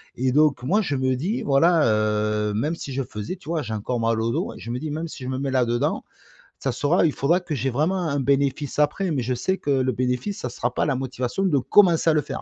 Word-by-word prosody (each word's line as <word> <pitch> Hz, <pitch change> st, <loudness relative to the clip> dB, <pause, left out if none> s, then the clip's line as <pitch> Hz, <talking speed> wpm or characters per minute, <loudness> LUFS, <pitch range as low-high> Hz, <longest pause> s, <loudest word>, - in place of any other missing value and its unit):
et 130 Hz, +1 st, 0 dB
donc, 150 Hz, -1 st, +3 dB
moi, 185 Hz, -, +2 dB
je 145 Hz, -9 st, -2 dB
me 130 Hz, -1 st, +1 dB
dis, 180 Hz, -, -2 dB
voilà, 160 Hz, +2 st, +3 dB
heu, 105 Hz, -1 st, +1 dB
même 150 Hz, +10 st, -1 dB
si 140 Hz, -4 st, -7 dB
je 135 Hz, -, -1 dB
faisais, 105 Hz, -, -5 dB
tu 175 Hz, -4 st, -13 dB
vois, 160 Hz, -4 st, -1 dB
j'ai 110 Hz, -, -5 dB
encore 115 Hz, +3 st, -2 dB
mal 115 Hz, 0 st, +1 dB
au 115 Hz, +1 st, 0 dB
dos -, -, -2 dB
et -, -, -12 dB
je 115 Hz, -, -8 dB
me 120 Hz, -, -2 dB
dis: 150 Hz, +3 st, -4 dB
«Même 160 Hz, +3 st, -3 dB
si 145 Hz, -, -9 dB
je -, -, -5 dB
me 130 Hz, 0 st, -2 dB
mets 140 Hz, -1 st, -2 dB
là 130 Hz, -2 st, +2 dB
dedans, 120 Hz, 0 st, -1 dB, 0.5 s
ça -, -, -2 dB
sera 160 Hz, +5 st, +2 dB
il 155 Hz, -, +2 dB
faudra 165 Hz, +6 st, +2 dB
que 175 Hz, -4 st, -5 dB
j'ai 135 Hz, 0 st, -1 dB
vraiment 155 Hz, +9 st, 0 dB
un 140 Hz, 0 st, 0 dB
bénéfice 140 Hz, +1 st, 0 dB
après» 160 Hz, +5 st, +1 dB
mais 140 Hz, -4 st, 0 dB
je 125 Hz, +1 st, -1 dB
sais 190 Hz, +10 st, -1 dB
que -, -, -5 dB
le 130 Hz, -2 st, +2 dB
bénéfice, 125 Hz, -, -2 dB
ça 125 Hz, -, -4 dB
sera 120 Hz, 0 st, -3 dB
pas -, -, 0 dB
la 140 Hz, -, +1 dB
motivation 130 Hz, +5 st, -3 dB
de 165 Hz, -8 st, +2 dB
commencer 170 Hz, +2 st, +4 dB
à 160 Hz, -, +4 dB
le 150 Hz, -, +2 dB
faire, 135 Hz, -2 st, -6 dB
135 Hz, 270 wpm, -23 LUFS, 125-155 Hz, 0.5 s, commencer